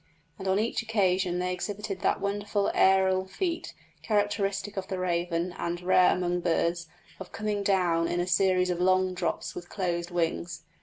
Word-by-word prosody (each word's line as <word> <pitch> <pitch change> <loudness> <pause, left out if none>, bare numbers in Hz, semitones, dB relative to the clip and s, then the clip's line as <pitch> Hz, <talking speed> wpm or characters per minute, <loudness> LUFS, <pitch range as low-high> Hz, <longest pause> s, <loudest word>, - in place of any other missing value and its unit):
And 190 - -5
on 190 +1 +2
each 225 +3 0
occasion 190 -5 +1
they 180 0 -1
exhibited 200 +1 -4
that - - +1
wonderful 205 0 -1
aërial 190 0 +3
feat, 340 - -3 0.3
characteristic 205 -1 -1
of 190 -1 -4
the 190 - -3
raven, 175 -1 -1
and 170 0 -2
rare 180 0 +4
among 180 -1 -1
birds, 170 0 0 0.3
of 190 -1 -9
coming 210 -2 -2
down 180 -4 +2
in 175 - -1
a 175 - +1
series 185 0 +2
of 175 0 -2
long 185 0 +3
drops 180 - -3
with 175 0 -8
closed 175 -3 -2
wings. 170 -1 -2
185 Hz, 165 wpm, -28 LUFS, 175-200 Hz, 0.3 s, rare